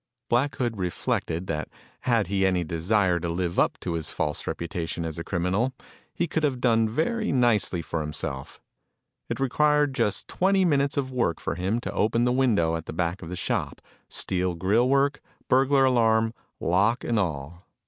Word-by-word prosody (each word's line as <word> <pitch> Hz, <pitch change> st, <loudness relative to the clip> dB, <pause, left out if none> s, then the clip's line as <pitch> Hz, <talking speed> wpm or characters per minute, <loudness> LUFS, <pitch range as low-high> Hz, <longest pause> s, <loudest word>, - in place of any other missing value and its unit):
Black 130 Hz, +4 st, +2 dB
Hood 120 Hz, -4 st, -2 dB
reflected 85 Hz, -1 st, -2 dB
that 80 Hz, -3 st, -3 dB, 0.3 s
had 115 Hz, -4 st, +1 dB
he 95 Hz, +1 st, 0 dB
any 90 Hz, -2 st, +2 dB
desire 90 Hz, +2 st, +1 dB
to 85 Hz, 0 st, -3 dB
live 85 Hz, 0 st, -1 dB
up -, -, +2 dB
to 85 Hz, -, -3 dB
his 80 Hz, -1 st, -3 dB
false 75 Hz, -2 st, -2 dB
reputation 85 Hz, -1 st, -3 dB
as 80 Hz, 0 st, -5 dB
a -, -, -3 dB
criminal, 95 Hz, +9 st, 0 dB, 0.4 s
he 175 Hz, -, -1 dB
could 160 Hz, -, -1 dB
have 140 Hz, -4 st, 0 dB
done 115 Hz, -3 st, +3 dB
very 215 Hz, -, 0 dB
nicely 115 Hz, -9 st, +2 dB
for 80 Hz, 0 st, -3 dB
himself. 75 Hz, -3 st, -5 dB, 0.7 s
It -, -, -3 dB
required 150 Hz, +2 st, +2 dB
just 110 Hz, -7 st, 0 dB
twenty 190 Hz, 0 st, +2 dB
minutes 145 Hz, -3 st, +1 dB
of 130 Hz, -2 st, -1 dB
work 120 Hz, -10 st, 0 dB
for -, -, -2 dB
him 95 Hz, +6 st, -1 dB
to -, -, -5 dB
open 115 Hz, +3 st, +2 dB
the 125 Hz, -, +2 dB
window 110 Hz, -11 st, +2 dB
at 80 Hz, -1 st, -6 dB
the -, -, -5 dB
back 85 Hz, +2 st, -2 dB
of 85 Hz, -, -8 dB
the 90 Hz, -, -4 dB
shop -, -, -2 dB, 0.3 s
steel 90 Hz, -1 st, -1 dB
grill 105 Hz, +8 st, +2 dB
work, 140 Hz, +1 st, +2 dB, 0.3 s
burglar 135 Hz, +1 st, +4 dB
alarm, 115 Hz, -3 st, +3 dB, 0.3 s
lock 105 Hz, +8 st, +2 dB
and 115 Hz, -2 st, +1 dB
all. 85 Hz, -1 st, -4 dB
105 Hz, 180 wpm, -26 LUFS, 85-130 Hz, 0.7 s, burglar